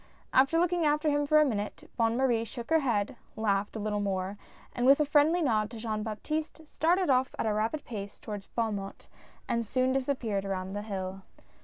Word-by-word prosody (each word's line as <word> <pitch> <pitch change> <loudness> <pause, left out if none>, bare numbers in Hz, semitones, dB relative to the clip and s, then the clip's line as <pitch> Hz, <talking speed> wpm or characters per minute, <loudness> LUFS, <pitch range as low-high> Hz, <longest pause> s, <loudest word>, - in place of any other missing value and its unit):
After 275 +5 +4
looking 350 0 +2
after 300 0 +2
him 290 0 +1
for 305 +1 +6
a 305 - +5
minute, 210 -6 -3
Bonne 230 0 +2
Marie 245 -4 +2
shook 235 +4 -8
her 320 - +6
head, 240 -3 0 0.2
laughed 205 -1 0
a - - -3
little 210 0 -1
more, 195 -1 -2 0.4
and 245 +1 +1
with 275 +2 +7
a 300 - +3
friendly 305 +4 +4
nod 215 -6 +1
to 230 - -9
Jean 220 -1 -3
Baptiste, 305 +9 -4
started 345 +1 +2
off 255 0 +2
at - - -1
a 215 - +1
rapid 225 +8 -1
pace 205 -4 -7
towards 205 -3 -7
Beaumont, 205 -4 -3 0.4
and 235 0 0
soon 255 +4 +1
disappeared 255 -7 -1
around 190 -1 -3
the 205 - -3
hill. 195 -2 -5
230 Hz, 195 wpm, -29 LUFS, 205-290 Hz, 0.4 s, with